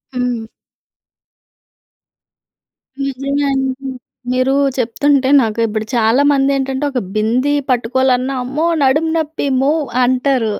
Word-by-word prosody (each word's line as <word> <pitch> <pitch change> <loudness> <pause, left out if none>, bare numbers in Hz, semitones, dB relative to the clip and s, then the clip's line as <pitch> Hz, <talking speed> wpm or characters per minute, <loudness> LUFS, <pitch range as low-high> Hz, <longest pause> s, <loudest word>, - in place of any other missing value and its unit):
హ్మ్. 245 -2 -2 2.6
నిజమే 275 +1 -2
అండి. 265 0 -2 0.4
మీరు 255 +1 +1 0.2
చెప్తుంటే 260 +3 +1
నాకు 225 -1 -2
ఇప్పుడు 215 0 -3
చాలా 230 +3 +3
మంది 275 -1 +2
ఏంటంటే, 270 0 -2
ఒక 260 - -1 0.2
బింది 240 +7 +1 0.2
పట్టుకోవాలన్నా. 255 +1 +1
అమ్మో! 275 +6 -2 0.2
నడుము 305 +5 +2
నొప్పి 315 -1 -3 0.2
మో 275 +2 +2 0.3
అంటారు. 255 -2 +1
260 Hz, 100 wpm, -16 LUFS, 245-275 Hz, 2.6 s, చాలా